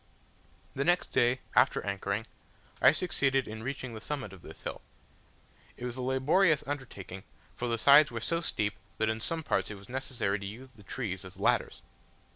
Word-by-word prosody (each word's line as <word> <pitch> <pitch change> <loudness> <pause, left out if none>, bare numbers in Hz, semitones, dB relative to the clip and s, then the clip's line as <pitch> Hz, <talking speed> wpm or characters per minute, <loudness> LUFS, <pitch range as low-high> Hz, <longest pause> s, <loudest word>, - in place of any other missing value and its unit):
The 140 - 0
next 175 +3 +2
day, 120 +2 +3
after - - +4
anchoring, 100 +2 -2 0.6
I - - +9
succeeded 135 -5 +1
in 110 +1 -6
reaching 130 0 -4
the 110 - -7
summit 135 -9 -4
of 95 - -12
this - - -12
hill. - - -5 1.0
It 125 - -6
was 120 -1 -4
a 130 - -4
laborious 145 +6 +3
undertaking, 115 -9 -6 0.3
for 120 - -3
the 115 -1 0
sides 145 +5 +7
were 115 - -4
so 165 +8 0
steep 105 -10 0 0.2
that 110 0 +1
in 110 0 -2
some 165 +6 -1
parts - - 0
it 105 - -5
was 100 0 -14
necessary 120 -6 -1
to 100 - -7
use 125 +6 -9
the 105 - -15
trees 100 -3 -4
as 95 0 -11
ladders. 100 - +1
120 Hz, 185 wpm, -30 LUFS, 105-140 Hz, 1.0 s, I